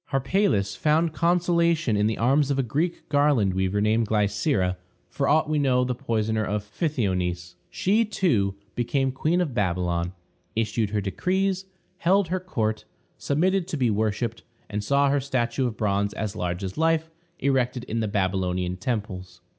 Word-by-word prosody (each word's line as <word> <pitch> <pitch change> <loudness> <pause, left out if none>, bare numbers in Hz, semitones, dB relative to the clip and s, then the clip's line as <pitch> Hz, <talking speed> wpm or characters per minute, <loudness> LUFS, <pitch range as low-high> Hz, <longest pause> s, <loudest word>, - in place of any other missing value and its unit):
Harpalus 135 - +1
found 155 +1 +2
consolation 170 -5 +2
in 105 +1 +2
the 110 - -1
arms 135 +4 +3
of 140 - +1
a 135 - +2
Greek 155 +9 -2
garland 145 -9 +3
weaver 95 +2 0
named 110 +2 +2
Glycera, 105 - +1 0.4
for 140 - -1
aught 155 +1 +3
we 155 -1 +1
know 130 -3 +3
the 125 0 -1
poisoner 110 -3 -1
of 105 0 -2
Pythionice. 90 - -1 0.2
She, 210 +5 +2
too, 120 - +1 0.2
became 135 +2 0
Queen 155 +7 0
of 155 -7 -2
Babylon, 90 -3 -1 0.4
issued 110 -1 0
her 105 0 -1
decrees, 190 - -1 0.3
held 190 +1 +3
her 185 +1 0
court, 110 -12 -2 0.4
submitted 180 +5 +1
to 165 - -3
be 125 -4 +2
worshiped, 110 +2 -1 0.3
and 105 0 -2
saw 140 +4 +3
her 145 - +2
statue 130 -1 -1
of 110 -3 -5
bronze, 100 -1 0
as 110 -1 -3
large 90 0 -3
as 95 +8 -5
life, 160 0 +1 0.3
erected 130 -2 0
in 115 -2 -3
the 110 - 0
Babylonian 95 -2 -1
temples. 95 -4 -4
120 Hz, 160 wpm, -25 LUFS, 100-155 Hz, 0.4 s, arms